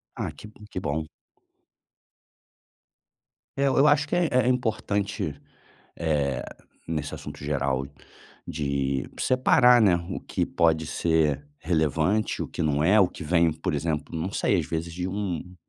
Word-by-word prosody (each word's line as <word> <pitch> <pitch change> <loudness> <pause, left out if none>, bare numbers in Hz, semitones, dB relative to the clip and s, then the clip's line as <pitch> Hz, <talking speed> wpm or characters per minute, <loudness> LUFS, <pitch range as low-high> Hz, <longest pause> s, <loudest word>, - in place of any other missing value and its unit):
Ah, - - -3
que - - -12
hum, 105 0 -15
que 90 - -4
bom. 75 -2 -3 2.5
Eh, 140 - +2
eu 135 +2 +4
acho 145 0 +4
que - - -1
é 175 -1 +2
é 125 -1 +3
importante, 105 - -1 0.6
eh, 70 -5 0 0.4
nesse 75 -3 -3
assunto - - -9
geral, 70 -2 -1 0.6
de 70 -2 -2
separar, 125 -1 +5
né, 100 -5 +5
o - - -3
que - - -2
pode 80 -1 +2
ser 75 -3 +1
relevante, 80 +5 +1
o - - -6
que - - -5
não 75 -2 +1
é. 100 +6 +5
O 95 - +5
que 90 - -9
vem, 85 +1 +3
por 80 +3 -3
exemplo, 75 +2 -2
não 80 +4 -2
sei 100 -1 +1
às 80 - -2
vezes 85 +1 -3
de 90 +1 -3
um 90 -2 -4
85 Hz, 150 wpm, -26 LUFS, 75-105 Hz, 2.5 s, separar